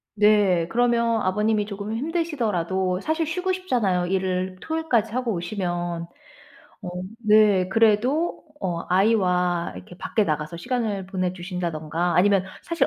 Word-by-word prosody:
네. 205 -5 +4
그러면 235 -2 +2
아버님이 210 +3 +1
조금 205 +1 -5
힘드시더라도 215 - -1
사실 315 +6 -1
쉬고 360 +4 -1
싶잖아요, 220 - 0
일을 185 0 -1
토요일까지 255 -9 0
하고 250 -2 0
오시면. 175 -2 -3 0.7
어 185 - -7 0.3
네. 210 -4 +4
그래도 230 - +2 0.2
어 175 -4 -2
아이와 180 - +2
이렇게 90 - -11
밖에 215 - 0
나가서 155 +1 -2
시간을 205 -1 -2
보내 185 -2 -2
주신다든가 175 -2 -3
아니면 195 0 +4 0.2
사실 335 0 0
200 Hz, 315 characters per minute, -24 LUFS, 180-230 Hz, 0.7 s, 네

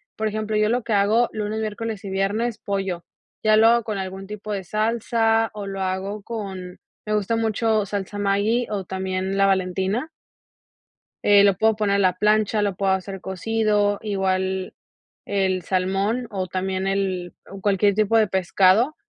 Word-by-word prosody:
por 220 0 -1
ejemplo, 215 0 -2
yo 215 0 +2
lo 240 0 0
que 225 - -2
hago 215 +4 +3
lunes, 215 0 -3
miércoles 215 -1 -4
y 195 - -6
viernes, 205 +4 -1
pollo. 195 -4 -3 0.4
Ya 215 0 +5
lo 225 +1 +6
hago 235 0 +4
con 210 -2 -3
algún 190 0 -5
tipo 210 +1 -6
de 195 -2 -3
salsa, 225 +2 +1
o 205 -1 -6
lo 195 0 -4
hago 190 +2 -3
con 195 -5 -6 0.3
me 215 - -2
gusta 210 +2 0
mucho 220 -1 +1
salsa 200 0 -4
Maggie 205 +4 +1
o 200 -3 -3
también 190 0 -3
la 195 - +4
Valentina 190 - 0 1.2
eh, 205 -1 +6
lo 200 -2 +4
puedo 220 +2 +3
poner 205 -2 +1
en - - +2
la 185 -1 +2
plancha, 210 0 +2
lo 200 -2 0
puedo 195 0 +1
hacer 190 0 -4
cocido. 205 +1 0
Igual 190 -2 -1 0.5
el 190 -2 0
salmón, 195 +7 0
o 190 -2 -3
también 190 +1 -2
el 190 -3 -1 0.2
o 195 -1 -9
cualquier 200 0 +3
tipo 215 +1 +3
de 215 -2 +4
pescado, 190 - +3
200 Hz, 170 wpm, -23 LUFS, 190-215 Hz, 1.2 s, lo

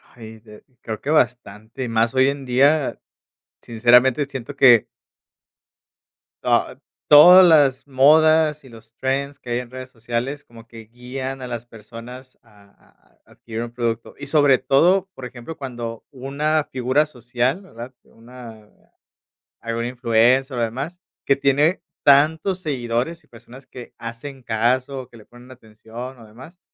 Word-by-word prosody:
Ay, 110 -1 -12
de 105 -1 -16 0.2
creo 110 -1 -6
que 145 - -6
bastante 120 -4 -1
y 120 - -4
más 115 +2 0
hoy 130 +1 +3
en 140 -1 -5
día. 140 +4 +2 0.6
Sinceramente, 125 +4 +3
siento 140 0 -8
que 125 -5 +6 1.6
ah, - - 0 0.3
todas 180 +5 +9
las 145 -5 +3
modas 155 +2 +3
y 130 - -15
los 115 0 -16
trends 140 +2 -3
que 120 - -9
hay 120 - 0
en 125 -1 -9
redes 130 0 -9
sociales 120 +4 -5
como 115 -1 -16
que 115 -1 -13
guían 130 +3 -7
a 125 - -6
las 120 -1 -6
personas 120 +3 -13
a 105 -3 -22
a - - -29 0.4
a, - - -21
adquirir 115 0 -7
un 120 - -8
producto 115 -1 -4
y 140 0 -8
sobre 145 -3 +4
todo, 175 +9 +2
por 130 - -9
ejemplo, 125 +6 -10
cuando 120 -4 -7
una 145 +3 -2
figura 130 +4 +1
social, 125 - -3
¿verdad? 125 - -11
Una 115 -2 -14 0.9
alguna 115 0 -4
influencer, 125 +2 +1
o - - -1
demás, 135 +10 -4 0.3
que 140 - +3
tiene 145 +6 +1 0.2
tantos 160 +6 +3
seguidores 130 +1 -3
y - - -29
personas 125 +3 -15
que 125 -2 -12
hacen 125 +4 -9
caso, 125 +4 -1
que - - -19
le 110 - -17
ponen 120 +1 -17
atención, 120 +2 -11
o 115 - -14
demás, 130 - -15
125 Hz, 150 wpm, -21 LUFS, 115-140 Hz, 1.6 s, todas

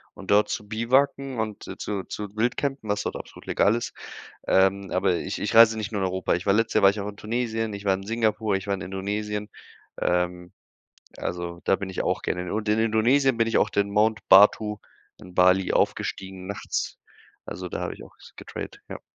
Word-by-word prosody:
und - - -6
dort 105 +1 +4
zu 105 - -4
Biwakieren 130 +3 +1
und 110 -2 -4
zu 100 -2 -3
zu 105 -1 -7
Wildcampen, 125 +1 -1
was 105 0 0
dort - - -3
absolut - - -10
legal 105 - +2
ist. 120 - -4 0.5
Ähm, 95 0 +2
aber 95 0 +2
ich 95 - -4
ich 105 - -2
reise 115 -1 +7
nicht 105 -3 -4
nur 100 -3 -2
in - - +2
Europa. 95 0 -1
Ich 85 - -3
war 100 - +3
letztes 115 +2 +1
Jahr 110 - +3
war 95 - +8
ich 100 +1 -5
auch 100 - -4
in 105 - -8
Tunesien, 115 0 -2
ich 100 0 -7
war 95 - +4
in 95 - -5
Singapur, 110 -2 0
ich 95 - -6
war 100 - 0
in 100 - -5
Indonesien. 105 +2 -3 0.5
Ähm, 90 0 -1 0.6
also 85 -1 -5
da - - +3
bin 95 0 -4
ich 95 - -3
auch - - -1
gerne. 90 +1 -3
Und 105 0 -2
in 105 +1 +2
Indonesien 115 +4 +3
bin 115 0 +2
ich 115 - +2
auch 105 - +2
den 100 -1 0
Mount 110 +2 +2
Batur 105 +2 +6 0.4
in 90 -1 -13
Bali 90 +1 +4
aufgestiegen 95 -1 -1
nachts. 100 +1 -4 0.5
Also, 90 -1 -6
da - - -5
habe - - -3
ich - - -11
auch - - -18
s - - -16
getrailed, - - -8
ja. - - -7
105 Hz, 210 wpm, -25 LUFS, 95-110 Hz, 0.6 s, war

